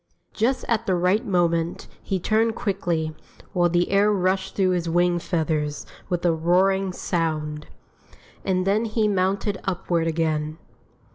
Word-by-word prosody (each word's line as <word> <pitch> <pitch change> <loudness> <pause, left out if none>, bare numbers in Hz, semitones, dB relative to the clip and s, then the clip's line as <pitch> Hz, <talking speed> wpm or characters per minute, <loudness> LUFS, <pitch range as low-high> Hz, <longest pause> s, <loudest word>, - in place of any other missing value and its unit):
Just 250 +4 0
at 230 -1 0
the 185 - +2
right 180 +5 +2
moment 170 -3 0
he 190 - -2
turned 220 +4 +1
quickly, 170 -7 -1 0.4
while 175 -2 +3
the 175 +1 +1
air 200 +1 +4
rushed 190 -1 0
through 190 -2 +2
his 175 -2 -1
wing 175 +1 +2
feathers 155 -4 -1 0.2
with 175 -1 -1
a 170 - +4
roaring 185 +4 +2
sound. 155 -4 -2 0.8
And 185 -1 0
then 210 +4 +2
he 220 -1 +1
mounted 195 +1 0
upward 175 -3 -1
again. 155 -1 -1
180 Hz, 140 wpm, -24 LUFS, 165-195 Hz, 0.8 s, air